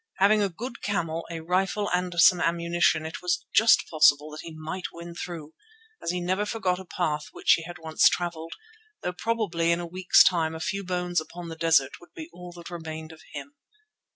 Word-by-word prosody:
Having 210 +2 +4
a 200 - +1
good 235 +7 -8
camel, 170 -5 -2
a 165 -1 -5
rifle 190 +4 0
and 180 0 -1
some 175 +1 +6
ammunition, 170 -2 +1
it 160 - -6
was 180 -1 -1
just 220 +3 +5
possible 150 -1 +4
that 155 - -8
he 165 - -9
might 160 +4 -6
win 170 0 -9
through, 165 -3 -7 0.5
as - - -3
he 180 +1 -1
never 185 +3 0
forgot 200 -4 -1
a 190 - -9
path 155 -4 -2
which - - +2
he - - +1
had 175 -2 -8
once 160 0 +3
travelled, 165 -2 -4 0.5
though 180 - -2
probably 180 -6 0
in 170 - +1
a 175 - -4
week's 180 +2 +5
time 160 -3 +1
a - - -6
few 200 +4 -3
bones 180 -2 -1
upon 170 +1 -9
the 165 - -6
desert 160 -4 +2
would 175 - -19
be 320 +1 -9
all 180 0 -10
that 170 0 -11
remained 160 -2 -7
of 160 - -14
him. 280 - -8
175 Hz, 205 wpm, -26 LUFS, 160-185 Hz, 0.5 s, some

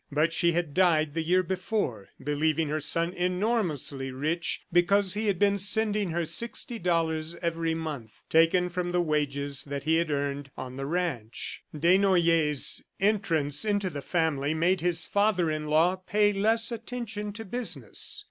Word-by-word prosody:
But 155 +3 +1
she 170 +1 +2
had 165 -3 -1
died 160 -5 +3
the 165 - -1
year 180 +3 +2
before, 185 - -2
believing 155 +2 0
her 155 +1 -1
son 165 +3 -1
enormously 180 - -1
rich 155 +6 -2
because 190 +2 +4
he 215 +1 -1
had 200 -3 +1
been 200 +1 +2
sending 205 0 +1
her 170 0 -1
sixty 230 +7 -2
dollars 165 -2 0
every 165 -1 -1
month, 150 -9 -6
taken 165 +3 +3
from 175 0 -3
the 180 - +2
wages 145 -3 -1
that 140 -1 -5
he 160 +2 +2
had 170 -1 0
earned 140 -1 -2
on 130 0 -6
the 135 +1 -4
ranch. 150 -10 -3
Desnoyers' 170 -3 +3 0.2
entrance 165 -8 +1
into 205 -3 0
the 145 -2 -5
family 155 -3 0
made 175 +2 +2
his 170 -1 +1
father 200 -5 +2
in 155 0 -3
law 165 +5 +3
pay 205 +2 +2
less 225 +4 +2
attention 230 -3 -5
to 225 +1 -7
business. 240 - -4
170 Hz, 155 wpm, -28 LUFS, 150-195 Hz, 0.2 s, because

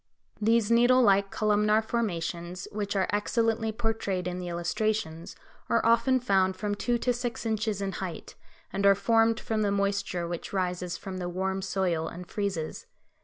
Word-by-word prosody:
These 225 0 +3
needle 245 +2 +5
like 200 -2 +4
columnar 210 +1 +2
formations, 180 -5 -3
which 205 -1 -3
are 190 -1 +2
excellently 225 +1 +1
portrayed 220 -5 -2
in 180 0 -3
the 180 - -5
illustrations, 175 0 -2 0.3
are 230 - +2
often 235 +3 +4
found 190 -5 +2
from 205 -1 -2
two 240 +4 0
to 245 +1 +1
six 240 -1 -4
inches 215 -2 -1
in 195 - -2
height, 180 -3 -6 0.4
and 195 +1 -1
are 200 - +7
formed 225 +2 +3
from 220 -1 -2
the 205 -1 +1
moisture 200 -3 -1
which 175 +2 -6
rises 180 -2 -2
from 190 -1 -6
the 175 -1 -3
warm 190 +2 -2
soil 185 -4 -1
and 180 +1 -8
freezes. 195 -7 -3
200 Hz, 165 wpm, -28 LUFS, 180-225 Hz, 0.4 s, are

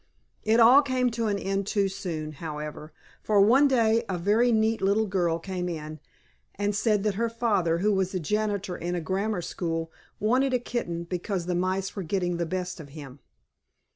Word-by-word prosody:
It 225 +2 +3
all 245 +5 +8
came 255 -3 0
to 230 0 -1
an 205 -1 0
end 195 0 -2
too 200 -2 +1
soon, 175 -6 -5
however, 150 0 -7 0.3
for 210 -2 +2
one 250 +8 +6
day 230 -3 +3
a 185 - -1
very 215 +7 +3
neat 220 0 +2
little 200 +3 +2
girl 175 -4 0
came 180 +1 -4
in 155 -2 -6 0.6
and 205 0 -1
said 215 -2 +1
that 210 -1 +1
her 235 - +1
father, 210 -8 +1
who 205 +4 +2
was 190 -1 0
janitor 200 +1 -1
in 175 +1 -3
a - - -1
grammar 190 +3 -2
school, 165 -2 -3 0.3
wanted 255 +5 +2
a - - +2
kitten, 175 -9 -3
because 180 +1 -3
the 180 - -1
mice 185 +2 -1
were 200 - -3
getting 175 0 -1
the 170 -1 -2
best 180 0 -4
of 150 -3 -10
him. 140 -2 -10
195 Hz, 185 wpm, -27 LUFS, 170-220 Hz, 0.6 s, all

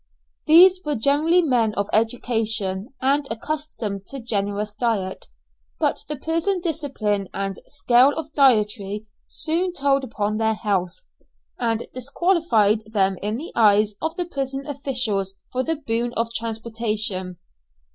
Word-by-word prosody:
These 365 +4 +7
were 300 -1 -1
generally 300 +9 +3
men 235 -7 +1
of 200 0 -1
education, 220 -2 0
and 280 +1 +2
accustomed 225 -6 -4
to 275 - -7
generous 205 -2 -2
diet, 210 -4 -2 0.5
but - - 0
the 300 - -3
prison 330 +6 -1
discipline 270 - -2
and 195 -1 -3
scale 255 -2 +4
of 310 -1 -6
dietary 210 -6 +2 0.2
soon 345 +3 -1
told 275 -3 +1
upon 215 -3 -2
their 220 0 +1
health, 195 -5 -2 0.6
and 230 0 -1
disqualified 250 - +1
them 195 -3 +2
in 210 +2 -2
the 310 +6 -7
eyes 210 -1 +4
of 320 +1 -2
the 355 - -2
prison 275 -4 -4
officials 250 -9 -1 0.2
for 255 - 0
the 325 +5 -1
boon 240 -4 -2
of 230 0 -2
transportation. 220 -5 -3
230 Hz, 130 wpm, -23 LUFS, 210-285 Hz, 0.6 s, These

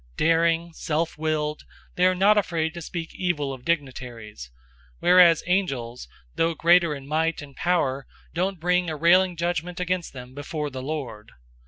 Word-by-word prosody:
Daring, 165 +1 +2
self 160 +1 -2
willed, 155 -1 -2 0.3
they 180 +1 +3
are 185 - +2
not 200 +3 +4
afraid 165 -6 0
to 170 - -7
speak 165 0 -6
evil 150 -7 -2
of 130 -2 -10
dignitaries; 125 - -4 0.5
002:011 - - -32
whereas 175 -2 +6
angels, 135 - -2 0.3
though 165 - 0
greater 170 -1 +4
in 135 -1 -10
might 160 +2 0
and 140 -2 -13
power, 140 -7 0 0.3
don't 185 +2 -1
bring 180 +1 +1
a 155 - -3
railing 175 +3 +4
judgment 175 +1 -2
against 180 -1 -2
them 125 -1 -10
before 145 +1 -4
the 130 0 -6
Lord. 125 -7 -6
165 Hz, 160 wpm, -25 LUFS, 140-175 Hz, 0.5 s, whereas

